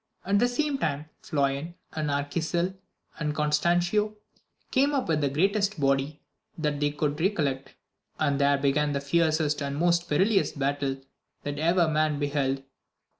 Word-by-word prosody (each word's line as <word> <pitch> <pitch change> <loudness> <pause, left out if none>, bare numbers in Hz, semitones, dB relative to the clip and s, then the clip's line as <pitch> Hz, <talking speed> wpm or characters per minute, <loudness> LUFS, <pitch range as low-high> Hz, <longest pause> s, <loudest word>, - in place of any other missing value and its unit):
At 200 +1 +3
the 245 - +4
same 280 +3 -1
time 145 - -1 0.2
Floyan, 140 +3 -1 0.2
and 155 -1 -2
Arquisil, 160 +5 -1 0.5
and 150 -1 -1
Constancio, 175 +8 +1 0.6
came 280 +2 +3
up 265 - 0
with 155 -2 +1
the 140 - +2
greatest 195 +5 +1
body 140 +1 +1 0.4
that 150 -3 -1
they 145 0 +2
could 145 0 -1 0.2
collect, 135 -4 -2 0.4
and 145 -2 +1
there 140 0 +4
began 145 +1 +1
the 140 - 0
fiercest 155 0 +1
and 140 0 -2
most 170 +1 +2
perilous 195 +6 +2
battle 140 -1 -1 0.5
that 145 0 -4
ever 170 +2 +3
man 155 -1 +1
beheld. 140 -2 -1
150 Hz, 145 wpm, -27 LUFS, 140-175 Hz, 0.6 s, the